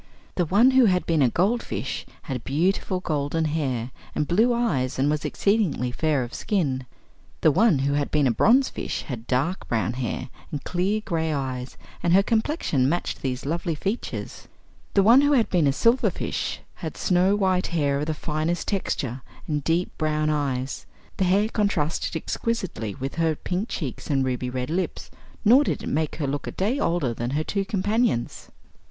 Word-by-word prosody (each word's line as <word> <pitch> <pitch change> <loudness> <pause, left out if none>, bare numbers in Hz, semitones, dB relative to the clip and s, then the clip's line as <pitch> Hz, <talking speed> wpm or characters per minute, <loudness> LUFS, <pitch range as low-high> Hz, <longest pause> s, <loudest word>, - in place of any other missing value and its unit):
The 175 - +1
one 215 +10 +5
who 260 -1 +6
had 180 -3 +2
been 165 -3 +2
a 130 - +5
goldfish 205 - -1 0.2
had 130 -6 -4
beautiful 180 +5 0
golden 155 -1 -1
hair 135 -6 -1 0.2
and 150 - 0
blue 220 +8 +3
eyes 165 - 0
and 140 +3 +2
was 150 -1 -1
exceedingly 200 - +1
fair 150 0 +1
of 120 - -8
skin; 135 - -1 0.5
the 155 - +5
one 205 +1 +4
who 140 - +1
had 145 0 0
been 150 -2 +2
a 125 - +4
bronzefish 245 - +2
had 120 -4 -7
dark 140 +9 0
brown 115 0 0
hair 125 -2 -3 0.2
and 145 -3 -5
clear 190 +4 0
gray 160 -2 -1
eyes 130 -3 -4 0.2
and 170 - +2
her 195 +2 +6
complexion 220 - +1
matched 175 +3 -2
these 130 -1 -3
lovely 170 +2 -1
features. 200 +9 -4 0.5
The 195 - +5
one 235 +6 +7
who 290 +1 +3
had 240 -5 +2
been 170 -5 +3
a - - +4
silverfish 230 - 0 0.2
had - - -5
snow 185 +1 +3
white 190 -2 +1
hair 145 -5 0
of 150 - -2
the 155 - -1
finest 155 +3 -2
texture 135 - -2 0.3
and 150 -2 -1
deep 170 +4 0
brown 155 -1 +1
eyes. 135 -3 -2 0.3
The 190 - +2
hair 195 +4 +3
contrasted 200 -9 -1
exquisitely 160 - -3
with 135 0 -4
her 160 -1 +2
pink 185 +8 -3
cheeks 140 -8 -5
and 135 -2 +2
ruby 125 -1 -2
red 125 +3 -3
lips, 185 +2 -3 0.3
nor 250 +7 +7
did - - -2
it - - -3
make 155 0 -1
her 155 - -2
look 140 +1 -3
a - - -3
day 220 +9 -1
older 165 - 0
than 120 +1 -3
her 155 - 0
two 200 +4 -1
companions. 210 - 0
160 Hz, 180 wpm, -25 LUFS, 135-195 Hz, 0.5 s, one